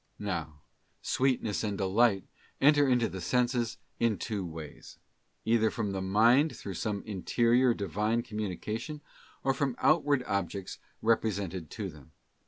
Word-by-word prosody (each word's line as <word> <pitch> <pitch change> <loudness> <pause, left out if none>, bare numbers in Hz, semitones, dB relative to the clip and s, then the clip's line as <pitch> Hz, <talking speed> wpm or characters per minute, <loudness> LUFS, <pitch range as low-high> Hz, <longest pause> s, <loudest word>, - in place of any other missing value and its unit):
'* - - -43
Now, 80 -7 -4 0.4
sweetness 125 -6 0
and 105 -2 -2
delight 100 +1 +2 0.3
enter 145 0 +5
into 125 -2 +3
the 95 - -6
senses 120 +2 0 0.2
in 115 -3 +2
two 105 -4 -3
ways: 80 -3 -9 0.5
either 110 -1 +3
from 105 -2 -2
the 95 -1 -3
mind 115 +10 +4
through 100 - -6
some 100 +3 -3
interior 120 +4 +2
Divine 105 +4 -1
com 110 -3 -6
munication, 110 - -4 0.4
or 135 - +2
from 135 -2 -1
outward 145 -3 +3
objects 100 -3 -3 0.2
represented 100 -7 0
to 100 -3 -5
them. 75 +1 -16
110 Hz, 140 wpm, -30 LUFS, 95-120 Hz, 0.5 s, enter